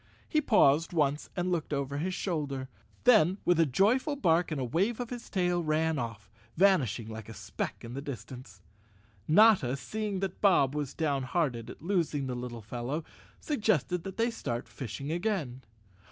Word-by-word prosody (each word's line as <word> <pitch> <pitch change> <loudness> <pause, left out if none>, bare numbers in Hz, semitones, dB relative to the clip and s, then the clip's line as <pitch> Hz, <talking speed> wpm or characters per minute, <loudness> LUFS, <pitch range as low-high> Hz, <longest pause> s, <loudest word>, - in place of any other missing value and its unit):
He 310 - +2
paused 165 - +4
once 150 -2 0
and 180 0 -1
looked 170 -4 -2
over 140 0 -2
his 185 +4 -2
shoulder, 140 -9 -3 0.3
then 200 -7 +5
with 175 -2 +3
a 165 - +5
joyful 225 - +2
bark 175 -8 +2
and 135 -7 -3
wave 210 +8 +1
of 245 -1 -4
his 240 -1 -7
tail 180 -2 +1
ran 155 0 +1
off, 115 -4 -5 0.3
vanishing 150 - +3
like 110 -1 -8
a 115 - -9
speck - - -5
in 115 - -8
the 135 - -4
distance. 120 -7 -9 0.6
Notta, 165 - +5
seeing 210 - -3
that 190 -2 -4
Bob 160 -9 +4
was 150 -3 -3
down¬ 145 -4 0
hearted 125 -3 -1
at - - -11
losing 165 -6 0
the 130 - -3
little 120 -2 -6
fellow, 125 +8 -4 0.4
suggested 210 - 0
that 190 -1 -7
they 230 +1 +1
start 120 - -4
fishing 140 +3 -6
again. 170 - -2
155 Hz, 170 wpm, -30 LUFS, 130-190 Hz, 0.6 s, then